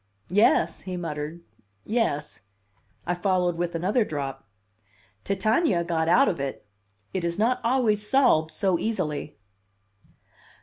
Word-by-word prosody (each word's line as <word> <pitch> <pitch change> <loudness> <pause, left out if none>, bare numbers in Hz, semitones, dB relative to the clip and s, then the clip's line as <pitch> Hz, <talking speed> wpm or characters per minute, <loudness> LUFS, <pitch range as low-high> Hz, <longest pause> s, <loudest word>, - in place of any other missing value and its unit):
"Yes," 185 -4 +3
he 185 -1 -5
muttered. 160 0 -5 0.4
"Yes." 220 -10 -1 0.6
I 175 - 0
followed 180 -1 +1
with 175 0 -2
another 195 +8 +1
drop. 140 -7 -5 0.8
"Titania 200 - +1
got 165 -1 0
out 255 +11 +5
of 170 - -1
it. 135 -6 -4 0.5
It 185 - -2
is 170 0 -1
not 235 +4 +1
always 225 -4 +1
solved 250 - +4
so 175 +2 0
easily." 165 -9 -3
180 Hz, 120 wpm, -26 LUFS, 160-210 Hz, 0.8 s, out